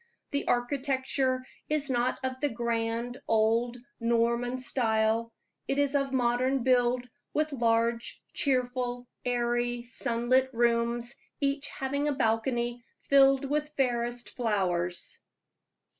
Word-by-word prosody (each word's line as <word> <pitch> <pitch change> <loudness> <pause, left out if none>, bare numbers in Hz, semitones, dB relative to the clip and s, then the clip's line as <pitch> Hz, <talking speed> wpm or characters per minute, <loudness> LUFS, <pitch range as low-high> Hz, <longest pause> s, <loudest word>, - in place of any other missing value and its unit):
The 280 - -1
architecture 260 0 0 0.2
is 300 -2 0
not 250 -1 +1
of 260 0 -3
the 290 +1 +1
grand 235 +1 -2
old 225 +2 +2 0.2
Norman 235 +1 +1
type; 225 -2 +1 0.4
it 275 - 0
is 285 -1 +2
of 275 -1 +1
modern 255 +1 +1
build, 250 -1 +2 0.3
with 305 0 +1
large, 230 -1 +1
cheerful, 250 -2 0 0.2
airy, 240 0 0
sunlit 240 +2 +1
rooms, 235 0 +1 0.3
each 280 0 0
having 280 +2 -2
a 295 - +2
balcony 240 0 0 0.2
filled 275 0 +5
with 300 +2 -2
fairest 240 -2 -1
flowers. 180 -7 -1
245 Hz, 110 wpm, -29 LUFS, 235-265 Hz, 0.4 s, filled